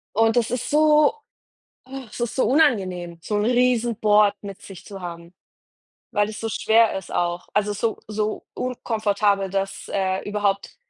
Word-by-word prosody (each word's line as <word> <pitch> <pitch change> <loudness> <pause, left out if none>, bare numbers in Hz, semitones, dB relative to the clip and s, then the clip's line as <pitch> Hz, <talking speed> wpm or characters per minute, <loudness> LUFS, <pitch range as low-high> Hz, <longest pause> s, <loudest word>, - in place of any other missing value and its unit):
Und 225 +2 +3
das 235 -2 +2
ist 250 0 -3
so, 300 +1 +4 0.7
ach, 260 -4 -9
es - - -10
ist 240 -1 -2
so 260 - +2
unangenehm, 190 - +1
so 210 - -2
'n 205 - +1
Riesenboard 230 -4 +3
mit 200 -2 -8
sich 195 -3 -12
zu 195 -2 -9
haben, 170 -1 -8 0.8
weil 205 - +2
das 215 0 -7
so 225 - -3
schwer 225 -1 +3
ist 190 - -8
auch. 175 0 -1
Also 210 0 +1
so 220 +2 -2
so 215 0 -3
unkomfortabel, 210 -5 0
dass, 195 0 -3
äh, 190 0 -1
überhaupt 205 -1 -1
210 Hz, 160 wpm, -23 LUFS, 195-235 Hz, 0.8 s, so